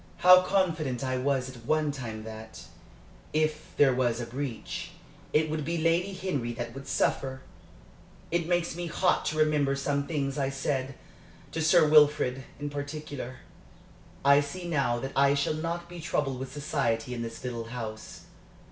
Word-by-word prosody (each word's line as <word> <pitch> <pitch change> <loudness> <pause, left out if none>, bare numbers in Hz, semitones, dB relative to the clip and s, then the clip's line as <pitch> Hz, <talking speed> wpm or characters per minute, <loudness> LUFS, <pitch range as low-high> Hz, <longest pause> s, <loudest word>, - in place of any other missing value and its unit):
How 185 0 +10
confident 165 -9 0
I 130 -1 0
was 130 -1 0
at 125 -3 -10
one 155 +4 +1
time 115 -6 -6
that, 110 0 -9 0.7
if 155 0 0
there 135 -3 +6
was 125 -2 +1
a 120 - -3
breach, 125 0 -5 0.4
it 155 +1 +3
would 155 0 -2
be 170 +4 -1
Lady 165 +4 +2
Henry 145 -11 -2
that 115 -1 -5
would 135 +1 -9
suffer! 130 -1 0 0.9
It 170 -1 0
makes 175 -2 0
me 175 0 -4
hot 180 +2 +1
to 155 - -1
remember 150 -3 +3
some 140 +1 -1
things 140 -3 -2
I 135 -1 +1
said 135 -1 -2 0.6
to 160 - -2
Sir 160 0 +5
Wilfrid, 150 -4 +4
in 145 0 -4
particular. 145 -3 -6 0.8
I 140 +1 +7
see 175 +5 -6
now 140 -7 +1
that 135 +3 -5
I 140 +1 +5
shall 140 +2 +1
not 170 +2 -3
be 175 0 -9
troubled 140 -5 -1
with 130 0 -6
society 130 -5 -1
in 120 - -4
this 115 0 -6
little 120 -2 -4
house." 115 -2 -7
140 Hz, 165 wpm, -28 LUFS, 130-155 Hz, 0.9 s, How